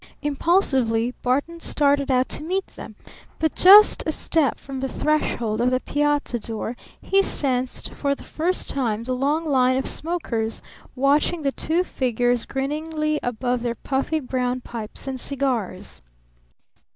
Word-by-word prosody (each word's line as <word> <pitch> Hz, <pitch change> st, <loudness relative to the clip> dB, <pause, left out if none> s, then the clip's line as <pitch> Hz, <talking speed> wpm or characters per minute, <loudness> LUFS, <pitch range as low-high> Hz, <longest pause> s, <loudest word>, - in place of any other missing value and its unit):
Impulsively 265 Hz, -, +1 dB
Barton 285 Hz, +7 st, -1 dB
started 285 Hz, -3 st, +1 dB
out 255 Hz, 0 st, +2 dB
to -, -, -1 dB
meet 370 Hz, +5 st, -1 dB
them, -, -, -11 dB, 0.4 s
but 315 Hz, -1 st, 0 dB
just 410 Hz, +3 st, +8 dB
a -, -, +2 dB
step 310 Hz, -2 st, 0 dB
from 270 Hz, -1 st, -7 dB
the 270 Hz, -, -2 dB
threshold 235 Hz, -8 st, 0 dB
of 245 Hz, -, +3 dB
the 255 Hz, 0 st, +1 dB
piazza 290 Hz, -3 st, 0 dB
door 225 Hz, +1 st, -5 dB, 0.2 s
he 390 Hz, 0 st, +2 dB
sensed 260 Hz, -8 st, 0 dB
for 280 Hz, -1 st, -1 dB
the -, -, -12 dB
first 345 Hz, +4 st, -2 dB
time 230 Hz, -5 st, -1 dB
the 255 Hz, +2 st, -2 dB
long 290 Hz, +6 st, 0 dB
line 260 Hz, -3 st, +3 dB
of 265 Hz, -, -1 dB
smokers 235 Hz, -10 st, -2 dB, 0.3 s
watching 290 Hz, +5 st, +2 dB
the 275 Hz, -, +1 dB
two 330 Hz, +6 st, 0 dB
figures 245 Hz, -5 st, 0 dB
grinningly 305 Hz, +2 st, -2 dB
above 245 Hz, +1 st, -1 dB
their 235 Hz, -1 st, -2 dB
puffy 275 Hz, +6 st, -1 dB
brown 255 Hz, -2 st, -2 dB
pipes 230 Hz, +1 st, -8 dB
and 260 Hz, -1 st, -3 dB
cigars. 245 Hz, -9 st, -3 dB
270 Hz, 145 wpm, -23 LUFS, 245-305 Hz, 0.4 s, just